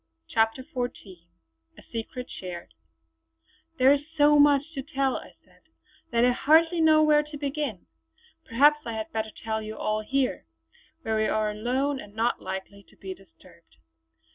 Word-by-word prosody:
CHAPTER 225 Hz, +3 st, +1 dB
XIV 245 Hz, -9 st, -6 dB, 0.5 s
A -, -, -14 dB
SECRET 240 Hz, +2 st, -5 dB
SHARED 175 Hz, -, -8 dB, 1.0 s
"There 260 Hz, +1 st, +6 dB
is 285 Hz, -, 0 dB, 0.2 s
so 295 Hz, 0 st, +6 dB
much 285 Hz, -1 st, +5 dB
to 275 Hz, -, -4 dB
tell" 275 Hz, -2 st, -1 dB
I -, -, -12 dB
said -, -, -26 dB, 0.5 s
"that 235 Hz, +1 st, +3 dB
I 250 Hz, -, +4 dB
hardly 325 Hz, +6 st, +3 dB
know 310 Hz, -1 st, +6 dB
where 300 Hz, -1 st, +5 dB
to 300 Hz, 0 st, -9 dB
begin. 280 Hz, -, -3 dB, 0.6 s
Perhaps 290 Hz, +6 st, +4 dB
I 230 Hz, -, -3 dB
had 220 Hz, 0 st, -5 dB
better 220 Hz, -1 st, -2 dB
tell 220 Hz, 0 st, -2 dB
you 215 Hz, 0 st, -7 dB
all 215 Hz, 0 st, -1 dB
here, 260 Hz, -, -1 dB, 0.6 s
where 220 Hz, -1 st, 0 dB
we 215 Hz, 0 st, +2 dB
are 215 Hz, -1 st, 0 dB
alone 260 Hz, +6 st, -1 dB
and 205 Hz, -4 st, -12 dB
not 230 Hz, +2 st, 0 dB
likely 190 Hz, +1 st, -6 dB
to -, -, -22 dB
be 190 Hz, -1 st, -7 dB
disturbed. 85 Hz, -, -21 dB
245 Hz, 160 wpm, -26 LUFS, 215-285 Hz, 1.0 s, There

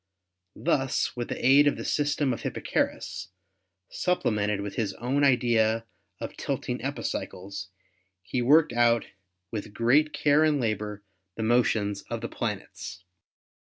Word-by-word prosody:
Thus 135 Hz, -5 st, 0 dB
with 120 Hz, -1 st, -3 dB
the -, -, -4 dB
aid 140 Hz, +3 st, +7 dB
of 145 Hz, -, +2 dB
the -, -, -5 dB
system 145 Hz, -2 st, +1 dB
of 115 Hz, -, -6 dB
Hipparchus, 95 Hz, -, -2 dB, 0.6 s
supplemented 105 Hz, -, 0 dB
with 100 Hz, 0 st, -5 dB
his 105 Hz, -4 st, -2 dB
own 130 Hz, +5 st, 0 dB
idea 115 Hz, -4 st, +3 dB, 0.3 s
of -, -, -6 dB
tilting -, -, -3 dB
epicycles, 95 Hz, +1 st, -4 dB, 0.5 s
he 125 Hz, +6 st, -2 dB
worked 150 Hz, +3 st, +5 dB
out 120 Hz, -1 st, +3 dB, 0.5 s
with 105 Hz, -1 st, -5 dB
great 140 Hz, +7 st, +3 dB
care 150 Hz, +1 st, +3 dB
and 155 Hz, -2 st, +3 dB
labor 105 Hz, -3 st, -2 dB, 0.3 s
the 110 Hz, -, -3 dB
motions 110 Hz, -3 st, +2 dB
of -, -, -3 dB
the -, -, -4 dB
planets. 85 Hz, -, -5 dB
120 Hz, 130 wpm, -27 LUFS, 105-140 Hz, 0.6 s, aid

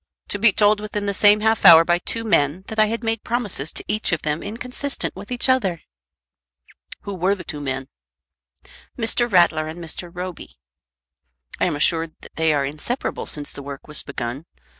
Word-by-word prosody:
"To 205 Hz, -, 0 dB
be 225 Hz, +1 st, +6 dB
told 210 Hz, +1 st, +3 dB
within 210 Hz, -1 st, -4 dB
the 200 Hz, -, -1 dB
same 205 Hz, +1 st, +5 dB
half 220 Hz, 0 st, +1 dB
hour 165 Hz, 0 st, +9 dB
by 175 Hz, 0 st, +2 dB
two 225 Hz, +5 st, -2 dB
men 170 Hz, -4 st, +1 dB
that 220 Hz, -, -4 dB
I 215 Hz, -, +5 dB
had 230 Hz, +2 st, -3 dB
made 225 Hz, -1 st, -1 dB
promises 210 Hz, -, -1 dB
to -, -, -4 dB
each 215 Hz, 0 st, +1 dB
of 165 Hz, -, -1 dB
them 150 Hz, +1 st, -1 dB
inconsistent 250 Hz, +6 st, -3 dB
with 200 Hz, +5 st, -10 dB
each 245 Hz, +1 st, +2 dB
other!" 200 Hz, -11 st, +1 dB, 1.2 s
"Who 200 Hz, -, -6 dB
were 190 Hz, +2 st, +1 dB
the 185 Hz, -, -9 dB
two 150 Hz, -3 st, -7 dB
men?" 135 Hz, -1 st, -4 dB, 1.1 s
"Mr. 240 Hz, 0 st, 0 dB
Rattler 170 Hz, -4 st, +3 dB
and 160 Hz, +2 st, -7 dB
Mr. 170 Hz, +1 st, -5 dB
Roby." 180 Hz, 0 st, -8 dB, 1.0 s
"I -, -, +2 dB
am 175 Hz, -4 st, -1 dB
assured 160 Hz, +1 st, +1 dB
that -, -, -14 dB
they 160 Hz, -1 st, +2 dB
are 145 Hz, -2 st, +1 dB
inseparable 155 Hz, -, -4 dB
since 145 Hz, -1 st, -2 dB
the -, -, -9 dB
work 140 Hz, 0 st, -9 dB
was 150 Hz, -1 st, -1 dB
begun. 135 Hz, +2 st, -6 dB
185 Hz, 185 wpm, -22 LUFS, 155-215 Hz, 1.2 s, hour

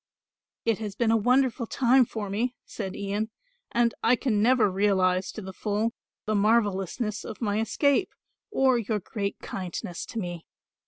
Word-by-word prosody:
"It 225 Hz, -2 st, +2 dB
has 210 Hz, -3 st, -5 dB
been 225 Hz, 0 st, +2 dB
a -, -, +5 dB
wonderful 245 Hz, +1 st, +2 dB
time 255 Hz, +1 st, +4 dB
for 220 Hz, -2 st, -5 dB
me," 235 Hz, +6 st, -1 dB
said 190 Hz, -4 st, -5 dB
Ian, 205 Hz, +2 st, -2 dB, 0.4 s
"and 235 Hz, -1 st, +2 dB
I 245 Hz, -, +5 dB
can 230 Hz, -5 st, 0 dB
never 235 Hz, -1 st, +5 dB
realise 190 Hz, -1 st, +2 dB
to 215 Hz, -, -7 dB
the 190 Hz, 0 st, -7 dB
full 210 Hz, +4 st, -1 dB, 0.3 s
the 215 Hz, -, 0 dB
marvellousness 210 Hz, 0 st, +1 dB
of -, -, -7 dB
my 210 Hz, -2 st, 0 dB
escape 280 Hz, -, +1 dB, 0.3 s
or 265 Hz, -, +3 dB
your 215 Hz, -1 st, -1 dB
great 200 Hz, +1 st, -4 dB
kindness 180 Hz, -1 st, -5 dB
to -, -, -8 dB
me. 175 Hz, -5 st, -4 dB
215 Hz, 160 wpm, -27 LUFS, 200-235 Hz, 0.4 s, a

